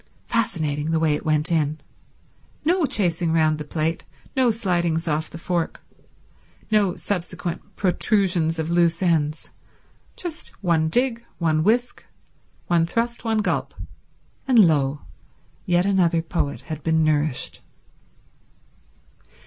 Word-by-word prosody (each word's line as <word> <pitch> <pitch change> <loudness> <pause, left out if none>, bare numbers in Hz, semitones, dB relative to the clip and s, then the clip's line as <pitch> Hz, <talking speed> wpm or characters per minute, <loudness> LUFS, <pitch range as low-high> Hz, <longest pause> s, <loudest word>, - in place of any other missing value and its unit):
Fascinating, 155 -9 -1
the 160 0 +1
way 160 -2 +2
it 150 - -4
went 155 +2 +1
in. 155 -2 +1 0.9
No 340 -1 +3
chasing 170 -6 0
round 155 -1 +2
the - - -3
plate, 160 +2 -2 0.3
no 260 -2 +4
slidings 175 -7 0
off 155 0 -1
the - - -9
fork, 170 0 -2 0.9
no 205 -4 +3
subsequent 180 0 -4
protrusions 180 -3 +1
of 160 +1 -2
loose 170 0 +2
ends—just 170 - -4
one 160 -3 +2
dig, 240 +3 0
one 155 -2 +1
whisk, 240 +6 +1 0.6
one 170 -1 +2
thrust, 235 +5 -2
one 220 -2 +1
gulp, - - -1 0.7
and 255 -2 +4
lo, 145 -2 +1 0.7
yet 175 +1 +3
another 175 -4 +2
poet 160 -3 -2
had 155 -1 -7
been 160 +1 +2
nourished. 150 -3 0
170 Hz, 115 wpm, -23 LUFS, 155-200 Hz, 0.9 s, no